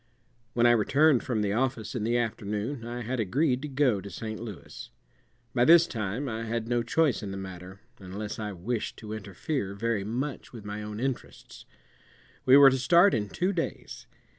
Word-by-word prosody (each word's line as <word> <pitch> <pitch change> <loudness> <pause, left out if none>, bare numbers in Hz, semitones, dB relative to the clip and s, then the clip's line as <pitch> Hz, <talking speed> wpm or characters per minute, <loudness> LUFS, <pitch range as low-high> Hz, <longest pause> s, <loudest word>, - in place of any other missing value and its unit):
When 120 -1 +3
I 120 - +7
returned 135 +5 +4
from 115 -5 -1
the 100 -1 0
office 120 -1 -1
in 120 - -3
the 120 +2 +1
afternoon 115 +2 -3
I 120 0 -5
had 125 +2 -3
agreed 130 - +1
to 150 - -4
go 130 -7 +1
to 100 - -8
St. 110 +1 -6
Louis. 110 -5 -9 0.6
By 120 - +3
this 170 +4 +7
time 115 - -3
I 115 -1 -3
had 115 0 -3
no 120 0 +1
choice 130 +2 +1
in 105 - -5
the 95 - -5
matter 95 0 -9 0.2
unless 100 +3 -6
I 105 -1 -3
wished 105 +6 -3
to 110 -1 -7
interfere 105 - -4
very 110 -1 -1
much 125 +8 -4
with 110 -4 -10
my 105 +1 -5
own 105 0 -6
interests. 130 0 -5 0.8
We 130 +2 +9
were 140 -1 +9
to 130 - 0
start 175 +8 +5
in 105 -4 -1
two 185 - -1
days. 165 -3 -5
115 Hz, 190 wpm, -28 LUFS, 105-130 Hz, 0.8 s, We